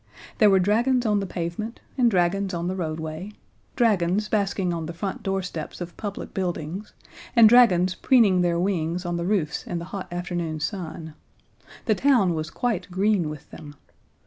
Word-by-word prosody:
There 215 -3 +7
were 195 - +5
dragons 240 +6 +2
on 210 -2 +2
the 195 - -3
pavement, 180 +7 -4 0.2
and 245 -3 +4
dragons 190 0 +1
on 170 +1 -2
the 185 - -2
roadway, 160 +2 -4 0.4
dragons 210 -4 +2
basking 195 -4 0
on 165 -2 -4
the 170 - -7
front 190 +3 -4
doorsteps 185 -5 -4
of 175 -2 -7
public 205 -2 -6
buildings, 180 +2 -4 0.4
and 230 -2 +9
dragons 190 -7 +5
preening 210 -8 +4
their 170 -1 +1
wings 175 -1 -1
on 175 0 -2
the 170 - -2
roofs 175 -8 0
in 175 - -3
the 170 - -5
hot 195 -3 -5
afternoon 175 -3 -3
sun. 160 -2 -5 0.7
The 220 - +3
town 230 -7 +3
was 155 0 -3
quite 225 -4 -2
green 190 -2 +1
with 150 -2 -10
them. 145 -1 -11
185 Hz, 170 wpm, -24 LUFS, 170-210 Hz, 0.7 s, and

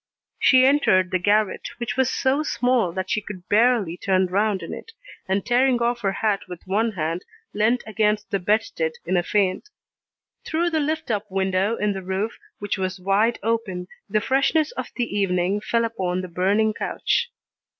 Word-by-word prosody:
She 260 -1 +6
entered 190 -10 +3
the 185 - +1
garret, 205 +2 +1
which 235 -2 -3
was 260 0 +2
so 265 +3 +1
small 245 - +1
that 185 +2 -4
she 215 - +1
could 185 -3 -9
barely 215 -5 +3
turn 190 0 +2
round 200 +2 0
in - - -6
it, 455 - -9 0.3
and 190 +1 0
tearing 250 +1 +3
off 240 0 0
her 195 -3 +1
hat 205 0 0
with 180 -2 -9
one 215 +4 0
hand 165 0 -2 0.3
leant 220 +4 +1
against 210 0 0
the 200 - +1
bedstead 175 -5 0
in 180 +2 0
a 175 - +3
faint. 195 - 0 0.7
Through 340 +2 0
the 320 - +1
lift 310 -2 -2
up 210 -1 -2
window 190 +2 0
in 210 -2 0
the 190 - -5
roof, 190 +4 -3 0.2
which 205 -1 -3
was 185 0 -2
wide 200 +5 +2
open, 215 -6 -2 0.2
the 215 +1 +1
freshness 275 - +2
of - - -5
the 245 - 0
evening 190 0 +1
fell 230 +1 +1
upon 185 -5 -2
the 185 - -6
burning 200 +5 +1
couch. 475 - -1
210 Hz, 180 wpm, -23 LUFS, 185-235 Hz, 0.7 s, She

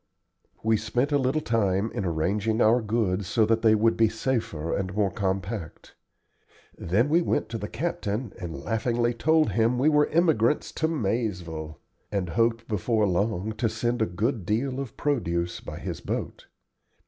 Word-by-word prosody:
We 110 0 +3
spent 120 +6 -1
a 145 - +3
little 130 +4 +1
time 105 -2 +1
in 100 - -3
arranging 100 +7 0
our 120 +2 +4
goods 105 -4 0
so 110 +2 +3
that 115 +1 +2
they 110 -1 +5
would 115 +2 +3
be 115 -1 +4
safer 110 - -2
and 95 -1 -3
more 100 -2 +1
compact. 95 -2 -4 0.8
Then 105 - +1
we 165 +4 +3
went 110 - 0
to 115 -1 -4
the 105 - -4
captain 115 - -3
and 85 -3 -5
laughingly 120 +1 0
told 155 +6 +2
him 115 +2 +2
we 140 +5 +4
were 150 -1 +4
emigrants 155 -6 +2
to 160 - 0
Maizeville, 95 - -2 0.3
and 95 -4 -1
hoped 115 +4 +1
before 110 +1 +1
long 100 +2 0
to 115 - +2
send 120 +2 -1
a 110 - +2
good 110 +5 -1
deal 125 +8 -1
of 135 -4 -6
produce 85 - -1
by - - -8
his - - -5
boat. - - -4
110 Hz, 165 wpm, -26 LUFS, 95-120 Hz, 0.8 s, they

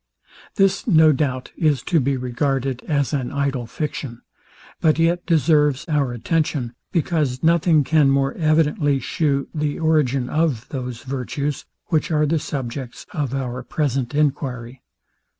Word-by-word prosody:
This, 195 +2 +2
no 160 -6 +6
doubt, 130 -3 -2
is 150 -6 +1
to 170 -2 +2
be 135 0 0
regarded 130 +1 -1
as 145 -1 0
an 130 -4 -1
idle 140 -4 -1
fiction; 135 -3 -5 0.6
but 155 -2 +3
yet 170 +1 +1
deserves 150 -4 +3
our 145 -5 +1
attention, 125 0 -1 0.2
because 155 -7 0
nothing 165 -2 +4
can 150 -1 +3
more 135 0 +2
evidently 155 -2 +2
shew 140 +1 -1
the 150 -2 -2
origin 145 -6 +1
of 150 -6 0
those 125 -4 -5
virtues, 135 +2 -3 0.2
which 160 -3 +1
are 150 -2 +2
the 160 +2 +1
subjects 130 -3 -5
of 140 -4 -2
our 125 -2 -3
present 135 0 -2
enquiry. 135 -4 -1
145 Hz, 135 wpm, -21 LUFS, 130-155 Hz, 0.6 s, no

